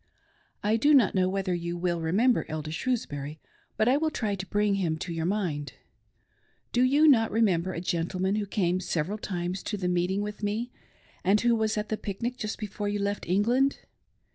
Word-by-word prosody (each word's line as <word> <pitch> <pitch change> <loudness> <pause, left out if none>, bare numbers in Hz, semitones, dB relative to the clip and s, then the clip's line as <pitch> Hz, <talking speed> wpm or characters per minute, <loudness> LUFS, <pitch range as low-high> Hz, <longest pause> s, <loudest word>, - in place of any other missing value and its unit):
I 215 +2 +2
do 290 +6 +5
not 245 -7 +5
know 185 -1 +2
whether 190 -1 -1
you 170 0 -3
will 175 -1 -1
remember 215 +10 +2
Elder 155 0 -4
Shrewsbury 155 - -3 0.4
but 215 - +2
I 260 +3 +5
will 315 +1 +1
try 220 -9 -2
to 190 -1 -5
bring 205 0 +1
him 160 -3 0
to 170 +2 -5
your 165 0 -1
mind. 175 -8 -2 1.0
Do 245 - +2
you 285 +5 +5
not 225 -6 +5
rememfcer 185 -5 +1
a - - -3
gentleman 185 +3 -1
who 205 -1 -2
came 185 -2 0
several 185 +3 -2
times 180 -1 -3
to 210 - -3
the 185 -2 -2
meeting 180 +2 +1
with 210 0 -6
me, 215 +4 -2 0.5
and 195 +3 +4
who 240 0 +3
was 220 -1 0
at 210 +1 -2
the 215 - -1
pic 200 +2 -6
nic 245 +1 -1
just 215 -4 -4
before 205 -1 -4
you 205 - -1
left 200 0 -2
England 240 +9 +2
200 Hz, 195 wpm, -28 LUFS, 175-220 Hz, 1.0 s, do